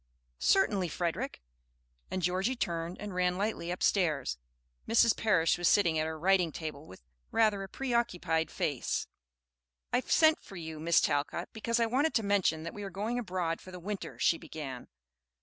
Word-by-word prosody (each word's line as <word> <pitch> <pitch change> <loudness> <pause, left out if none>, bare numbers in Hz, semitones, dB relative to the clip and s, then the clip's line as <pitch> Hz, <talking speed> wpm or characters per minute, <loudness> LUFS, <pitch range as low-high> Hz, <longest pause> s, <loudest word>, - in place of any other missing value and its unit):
"Certainly, 205 - +3
Frederick." 165 - -3 0.7
And 185 -1 -3
Georgie 190 +8 +1
turned 170 -5 -3
and 205 -2 -6
ran 180 0 +1
lightly 200 -4 -2
upstairs. 160 - +1 0.5
Mrs. 230 0 +5
Parish 180 -7 +2
was 175 - +2
sitting 170 -6 +4
at 155 - 0
her 160 0 -4
writing 180 0 +3
table 155 -1 -6
with 95 - -13 0.3
rather 215 -3 +2
a 195 - -6
preoccupied 190 - 0
face. 140 -5 -1 0.9
"I 245 - +4
sent 315 +3 +4
for 195 - -12
you, 160 -3 -6
Miss 165 +1 +4
Talcott, 145 +4 -1
because 230 +1 -1
I 230 - +4
wanted 270 +7 +1
to 225 - +3
mention 195 -6 +1
that 170 - -6
we 205 - -7
are 200 - -4
going 210 +6 -2
abroad 180 -6 -2
for - - -12
the 180 -1 -8
winter," 200 +3 -5
she 165 - +2
began. 135 -5 -7
180 Hz, 165 wpm, -31 LUFS, 165-210 Hz, 0.9 s, Mrs